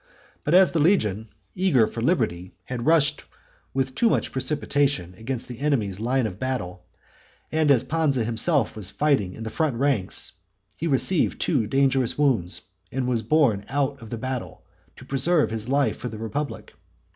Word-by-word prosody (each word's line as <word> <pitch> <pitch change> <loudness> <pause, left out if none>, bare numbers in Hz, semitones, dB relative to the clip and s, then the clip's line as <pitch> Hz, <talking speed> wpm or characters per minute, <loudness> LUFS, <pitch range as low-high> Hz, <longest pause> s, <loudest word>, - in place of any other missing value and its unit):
But 150 - +2
as 185 -1 +6
the 165 - 0
legion, 110 - +2 0.3
eager 180 -11 +3
for 115 - -6
liberty, 110 - 0
had 120 +4 -5
rushed 150 -2 +3 0.5
with 130 -1 -1
too 230 - +3
much - - 0
precipitation 135 - 0
against 120 +4 -5
the 120 -2 -8
enemy's 115 -10 0
line 125 +3 +1
of 100 -2 -5
battle, 90 -9 -3 0.7
and 155 -1 +2
as 135 -5 +5
Pansa 150 -6 +1
himself 120 +3 +1
was 105 -3 -2
fighting 120 -10 0
in 110 - -7
the 110 - -5
front 155 -6 0
ranks, 125 -7 0 0.4
he 165 - -3
received 155 +4 +1
two 125 -10 +1
dangerous 135 0 +1
wounds, 120 -11 0 0.3
and 130 0 -2
was 120 -3 0
borne 120 -9 +2
out 140 0 -1
of 115 - -10
the 115 - -4
battle, 130 +2 -5 0.3
to - - -13
preserve 145 +1 +2
his 110 +1 -3
life 140 -5 +1
for 125 - -5
the 110 - -8
republic. 115 +3 -5
130 Hz, 170 wpm, -24 LUFS, 110-145 Hz, 0.7 s, as